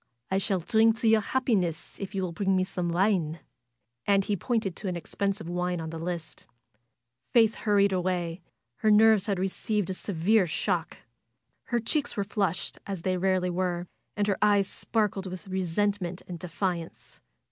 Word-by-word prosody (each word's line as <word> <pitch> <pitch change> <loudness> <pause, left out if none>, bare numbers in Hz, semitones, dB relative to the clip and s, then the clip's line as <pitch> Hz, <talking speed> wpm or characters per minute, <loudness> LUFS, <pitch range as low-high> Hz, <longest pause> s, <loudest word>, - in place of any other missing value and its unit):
"I 190 - +3
shall 195 0 +1
drink 220 +4 +3
to 230 - +2
your 220 -1 +5
happiness 200 -9 -1
if 195 0 -6
you 190 - 0
will 180 - -2
bring 195 +2 +1
me 185 - +3
some 180 -2 -3
wine." 170 -3 +1 0.7
And 195 -1 +4
he 205 - 0
pointed 210 -3 -1
to 205 - -4
an 180 - -1
expensive 195 +1 -3
wine 180 0 -1
on 160 -1 -5
the 165 - -6
list. 165 -2 -5 0.9
Faith 225 -2 +5
hurried 200 -2 +2
away. 180 -2 -1 0.4
Her 215 - +2
nerves 215 -1 +6
had 200 -2 0
received 195 +1 -1
a - - -1
se 200 +2 -5
vere 185 +4 +3
shock. 175 0 -1 0.7
Her 240 - 0
cheeks 285 +5 -1
were 200 - +1
flushed, 195 -3 -2
as 195 -4 -4
they 185 -1 +1
rarely 185 0 +1
were, 175 -1 -1 0.3
and 205 - +2
her 200 -2 0
eyes 205 -1 +4
sparkled 205 -3 -1
with 185 +2 -7
resentment 190 0 -1
and 175 -2 -6
de 180 - -6
fiance. 170 -1 -4
190 Hz, 175 wpm, -28 LUFS, 175-210 Hz, 0.9 s, nerves